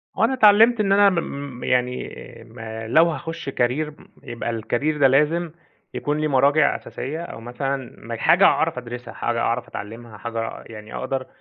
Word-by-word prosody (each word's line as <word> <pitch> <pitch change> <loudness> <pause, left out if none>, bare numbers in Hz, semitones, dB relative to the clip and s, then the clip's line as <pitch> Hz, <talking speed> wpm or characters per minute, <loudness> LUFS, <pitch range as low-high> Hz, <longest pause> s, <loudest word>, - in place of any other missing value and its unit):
وأنا 265 - +2
اتعلمت 225 0 +6
إن 200 -2 +1
أنا 200 0 +6
م 140 -7 -4
يعني 125 0 0 0.4
ما 110 0 -8
لو 155 +8 +5
هاخش 165 -3 -5
career 135 +5 -1 0.3
يبقى 115 -1 -4
الcareer 150 +7 -1
ده 135 - +6
لازم 150 +5 +2 0.4
يكون 145 +1 -2
ليه 155 - +1
مراجع 140 +2 +3
أساسية، 155 +6 -6
أو 115 - -9
مثلًا 130 +2 -4
م 115 - -4
حاجة 170 - +3
أعرف 160 -4 +3
أدرسها، 125 0 -7
حاجة 120 -1 -2
أعرف 120 +1 -1
أتعلمها، 115 0 -9
حاجة 115 0 -5
يعني 110 -1 -10
أقدر 135 -1 -3
135 Hz, 160 wpm, -22 LUFS, 120-155 Hz, 0.4 s, اتعلمت